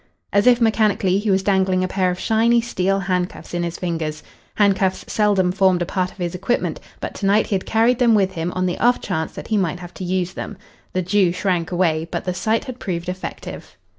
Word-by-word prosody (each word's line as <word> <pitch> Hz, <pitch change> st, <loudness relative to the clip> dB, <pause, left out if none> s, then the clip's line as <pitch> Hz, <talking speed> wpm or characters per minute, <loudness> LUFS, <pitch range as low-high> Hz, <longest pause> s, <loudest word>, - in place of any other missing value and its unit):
As 205 Hz, +3 st, +3 dB
if 245 Hz, -1 st, +6 dB
mechanically, 215 Hz, -4 st, +2 dB
he 210 Hz, +1 st, -2 dB
was 190 Hz, 0 st, +2 dB
dangling 190 Hz, -2 st, +2 dB
a -, -, 0 dB
pair 185 Hz, 0 st, +1 dB
of 180 Hz, 0 st, -3 dB
shiny 230 Hz, +2 st, +3 dB
steel 195 Hz, -4 st, 0 dB
handcuffs 180 Hz, -1 st, -3 dB
in 175 Hz, -, -1 dB
his 170 Hz, 0 st, -3 dB
fingers. 160 Hz, -4 st, -3 dB, 0.3 s
Handcuffs 195 Hz, -2 st, +2 dB
seldom 200 Hz, -4 st, +2 dB
formed 185 Hz, -2 st, +3 dB
a -, -, -3 dB
part 185 Hz, +1 st, -1 dB
of -, -, -20 dB
his 175 Hz, -2 st, -3 dB
equipment, 195 Hz, +7 st, -1 dB, 0.2 s
but -, -, -5 dB
to 195 Hz, -, -2 dB
night 205 Hz, +2 st, +4 dB
he -, -, -4 dB
had 190 Hz, -, -1 dB
carried 230 Hz, +3 st, +3 dB
them 235 Hz, -3 st, +5 dB
with 195 Hz, -2 st, +2 dB
him 170 Hz, -1 st, -3 dB
on 185 Hz, 0 st, -1 dB
the 180 Hz, -, -2 dB
off 245 Hz, +1 st, +3 dB
chance 160 Hz, -5 st, -3 dB
that -, -, -9 dB
he 220 Hz, -, +2 dB
might 175 Hz, -3 st, 0 dB
have 175 Hz, 0 st, -10 dB
to -, -, -7 dB
use 180 Hz, 0 st, -1 dB
them. -, -, -6 dB, 0.4 s
The 185 Hz, -, 0 dB
Jew 185 Hz, 0 st, +3 dB
shrank 180 Hz, -2 st, -1 dB
away, 165 Hz, -3 st, +1 dB
but -, -, -3 dB
the 180 Hz, -, -1 dB
sight 215 Hz, +5 st, 0 dB
had 255 Hz, -1 st, -7 dB
proved 175 Hz, -2 st, -3 dB
effective. 185 Hz, 0 st, -7 dB
185 Hz, 225 wpm, -21 LUFS, 180-205 Hz, 0.4 s, if